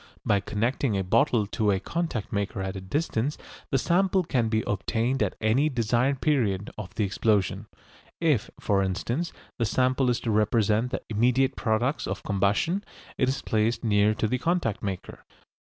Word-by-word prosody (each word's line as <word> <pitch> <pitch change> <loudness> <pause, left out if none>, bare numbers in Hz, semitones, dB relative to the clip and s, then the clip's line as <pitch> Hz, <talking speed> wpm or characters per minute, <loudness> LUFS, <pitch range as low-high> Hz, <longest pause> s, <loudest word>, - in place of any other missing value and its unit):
By 100 - +3
connecting 115 +3 -1
a 95 - 0
bottle 115 +3 +2
to 105 +1 0
a 95 -1 +2
contact 160 - -3
maker 100 -1 -2
at 95 +1 -4
a 95 - -5
distance 140 - -1 0.3
the 135 - +2
sample 185 +6 +2
can 125 -8 0
be 110 -1 +1
obtained 115 +6 -1
at - - 0
any 120 +8 +2
desired 125 +2 +1
period 105 -10 +1
of 100 -2 -8
the 110 - +1
explosion. 100 -1 0 0.5
If, 150 -10 +1
for 100 -1 +1
instance, 115 - -2 0.3
the 115 - +2
sample 130 +3 +2
is 120 - +1
to 115 - -1
represent 110 +2 +2
the - - -4
immediate 125 +5 +2
products 120 +6 0
of - - -4
combustion, 100 - +1 0.4
it 130 - +3
is 135 - -2
placed 110 +2 0
near 105 -1 +3
to 110 - -1
the 125 +4 -1
contact 170 - 0
maker. 95 -3 -5
115 Hz, 170 wpm, -26 LUFS, 105-135 Hz, 0.5 s, By